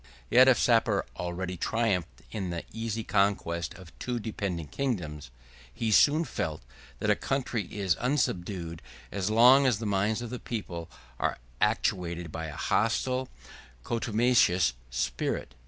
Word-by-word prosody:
135 - - -4
Yet 130 +1 +9
if 130 - +6
Sapor 115 -2 +3
already 90 +1 -4
triumphed 90 - -1
in 100 -5 -3
the 85 -1 -4
easy 115 0 -3
conquest 85 -5 0
of 90 -3 -13
two 125 -1 -2
dependent 95 -8 -4
kingdoms, 85 - -3 0.4
he 110 - -2
soon 150 +9 +5
felt, 80 - -3 0.3
that - - +1
a - - +4
country 125 -6 -2
is 95 -2 0
unsubdued 90 - -1 0.3
as 100 0 -1
long 125 +5 +7
as 120 -5 +3
the 110 - -5
minds 105 +3 0
of 120 - -6
the 125 - -4
people 85 -8 -5 0.3
are - - 0 0.2
actuated 90 -6 0
by 80 +1 -4
a 75 - -7
hostile 125 +7 0
and 60 -1 -20
contumacious 115 - +3 0.2
spirit. - - -2
100 Hz, 145 wpm, -29 LUFS, 85-115 Hz, 0.4 s, Yet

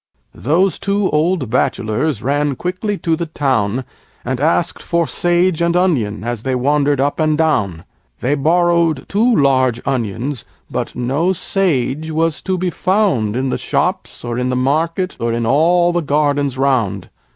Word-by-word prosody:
Those 165 - +1
two 200 0 0
old 155 -5 0
Bachelors 115 +3 0
ran 145 +1 0
quickly 185 - -3
to 165 -3 0
the 170 +1 -4
town 130 -6 0 0.4
And 125 0 -2
asked 165 +3 +1
for 170 -1 0
Sage 175 +1 +1
and 170 0 +1
Onion 120 - 0
as 120 -2 -3
they 130 +1 -1
wandered 145 +2 +1
up 140 +3 0
and 155 -1 +2
down; 100 - 0 0.4
They 130 - 0
borrowed 165 +1 +2
two 230 +4 +2
large 130 - +2
Onions, 125 +1 -2 0.3
but - - -3
no 140 +9 0
Sage 160 -5 -1
was 160 0 0
to 190 -1 -1
be 180 0 -1
found 180 - +1
In 130 +1 -1
the - - -2
Shops, - - -2
or 120 0 -3
in 125 0 -1
the 125 - 0
Market, 165 +8 0
or 115 0 -1
in 115 0 -1
all 175 +7 +3
the 175 - +1
Gardens 145 -2 0
round. 115 -9 0
145 Hz, 160 wpm, -17 LUFS, 125-170 Hz, 0.4 s, all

